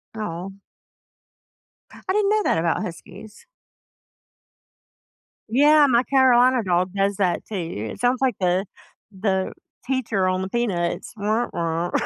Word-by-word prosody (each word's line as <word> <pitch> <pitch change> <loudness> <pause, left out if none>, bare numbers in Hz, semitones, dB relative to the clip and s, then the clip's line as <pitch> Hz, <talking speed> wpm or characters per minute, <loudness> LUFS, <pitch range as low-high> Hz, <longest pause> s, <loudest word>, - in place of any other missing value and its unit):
Oh. 190 -3 -5 1.6
I - - +1
didn't 410 0 +2
know 425 -1 +2
that - - +1
about 165 0 0
Huskies. 185 +5 -10 2.0
Yeah, 295 +4 +5
my 240 0 +3
Carolina 255 -2 +4
dog 180 0 0
does 200 0 0
that 185 -3 0
too. 165 - -5
It - - -10
sounds 245 +1 +1
like 255 -5 +1
the 185 +1 +1 0.5
the 190 -1 -1 0.3
teacher 235 -7 0
on 185 0 0
the 190 - -4
Peanuts, 190 -8 -2
"Wah, 215 +4 0
wah." 170 +1 -2
200 Hz, 125 wpm, -23 LUFS, 180-245 Hz, 2.0 s, Yeah